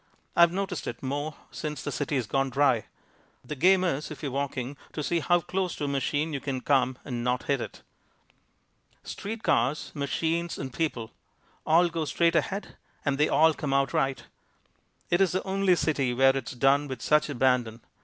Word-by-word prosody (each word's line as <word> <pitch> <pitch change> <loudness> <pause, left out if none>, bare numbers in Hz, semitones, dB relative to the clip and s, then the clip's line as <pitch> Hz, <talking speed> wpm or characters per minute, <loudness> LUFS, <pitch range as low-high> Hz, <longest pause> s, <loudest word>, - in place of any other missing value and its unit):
I've 170 0 +6
noticed 195 +1 -3
it 120 - -6
more 145 +3 -3 0.2
since 150 -3 -5
the - - -3
city's 145 -4 -1
gone 135 +3 0
dry. 130 -4 +2 0.6
The 135 - -5
game 185 +6 +4
is, 155 -5 -1
if 155 0 -9
you 140 - -1
are - - -8
walking, 135 -1 -3 0.2
to 150 - -3
see 170 +3 +1
how 175 +1 +2
close 185 +1 -2
to - - -5
a - - 0
machine 145 +3 -1
you 140 - -2
can 135 -2 -3
come 130 -2 +2
and 120 -3 -4
not 125 +1 0
hit 140 -3 0
it. - - -8 1.2
Street 220 +2 -6
cars, 150 +4 +1
machines 165 +4 -1
and 130 -2 -6
people 125 -9 -2 0.6
all 170 +3 +5
go 165 -2 -3
straight 170 +2 +2
ahead 195 +3 -2 0.3
and 140 -1 0
they 150 - +3
all 160 0 +5
come 140 -2 -2
out 140 0 +1
right. 135 -1 0 0.9
It's 180 +1 +3
the 185 - -1
only 190 -1 +2
city 140 -7 0
where 135 +1 +5
it's 135 -2 -4
done 140 +3 +3
with 130 -4 -6
such 150 0 +3
abandon. 125 -4 +1
145 Hz, 185 wpm, -27 LUFS, 135-165 Hz, 1.2 s, I've